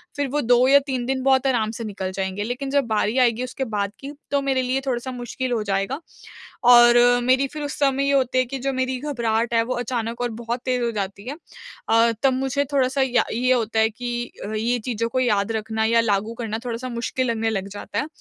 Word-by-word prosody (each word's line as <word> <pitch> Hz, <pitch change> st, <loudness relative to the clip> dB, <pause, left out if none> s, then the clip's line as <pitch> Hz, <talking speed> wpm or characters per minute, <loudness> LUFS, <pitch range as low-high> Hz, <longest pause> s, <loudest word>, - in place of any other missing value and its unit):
फ़िर 285 Hz, -2 st, -1 dB
वो 295 Hz, -, +1 dB
2 245 Hz, +1 st, +4 dB
या 280 Hz, +1 st, +7 dB
3 255 Hz, -3 st, -2 dB
दिन 260 Hz, +1 st, -1 dB
बहुत 265 Hz, 0 st, +3 dB
आराम 225 Hz, -5 st, +1 dB
से 230 Hz, +1 st, -6 dB
निकल 195 Hz, -3 st, -4 dB
जाएँगे। 190 Hz, +1 st, -3 dB
लेकिन 250 Hz, +5 st, -4 dB
जब 280 Hz, 0 st, +3 dB
बारी 215 Hz, +2 st, 0 dB
आएगी 240 Hz, -1 st, +2 dB
उसके 255 Hz, +2 st, -4 dB
बाद 200 Hz, -1 st, -1 dB
की 275 Hz, +1 st, -7 dB, 0.2 s
तो 280 Hz, -1 st, +2 dB
मेरे 270 Hz, -1 st, +1 dB
लिए 255 Hz, +1 st, -1 dB
थोड़ा-सा 260 Hz, 0 st, -2 dB
मुश्किल 250 Hz, +1 st, -4 dB
हो 235 Hz, -2 st, 0 dB
जाएगा। 195 Hz, +7 st, -1 dB, 0.7 s
और 240 Hz, 0 st, +8 dB, 0.3 s
मेरी 260 Hz, +2 st, +3 dB
फ़िर 300 Hz, +2 st, -7 dB
उस 290 Hz, 0 st, -5 dB
समय 275 Hz, -1 st, +2 dB
ये 280 Hz, -, +2 dB
होती 260 Hz, -2 st, +2 dB
है 255 Hz, -, +4 dB
कि 270 Hz, +2 st, -6 dB
जो 270 Hz, +1 st, -2 dB
मेरी 260 Hz, 0 st, -1 dB
घबराहट 235 Hz, -5 st, -1 dB
है 230 Hz, -, +4 dB
वो 255 Hz, +2 st, -3 dB
अचानक 235 Hz, -1 st, -3 dB
और 245 Hz, -1 st, -1 dB
बहुत 235 Hz, +1 st, -3 dB
तेज़ 250 Hz, -1 st, 0 dB
हो 235 Hz, -, 0 dB
जाती 200 Hz, 0 st, -5 dB
है। 285 Hz, -, -4 dB, 0.5 s
अ, 230 Hz, +1 st, +4 dB
तब 270 Hz, -1 st, +4 dB
मुझे 270 Hz, +2 st, 0 dB
थोड़ा-सा 270 Hz, 0 st, +2 dB
या 250 Hz, -2 st, +2 dB
ये 250 Hz, +3 st, +2 dB
होता 225 Hz, -3 st, 0 dB
है 220 Hz, -, +4 dB
कि 240 Hz, +1 st, -5 dB, 0.2 s
ये 235 Hz, +3 st, 0 dB
चीज़ों 230 Hz, 0 st, -2 dB
को 255 Hz, +2 st, -1 dB
याद 210 Hz, -4 st, +1 dB
रखना 220 Hz, 0 st, -2 dB
या 230 Hz, +1 st, +4 dB
लागू 215 Hz, 0 st, 0 dB
करना 225 Hz, -2 st, -4 dB
थोड़ा-सा 245 Hz, +1 st, -4 dB
मुश्किल 250 Hz, +2 st, -2 dB
लगने 225 Hz, -1 st, 0 dB
लग 195 Hz, -3 st, -3 dB
जाता 205 Hz, +1 st, -6 dB
है। 295 Hz, -, -3 dB
245 Hz, 225 wpm, -23 LUFS, 225-260 Hz, 0.7 s, और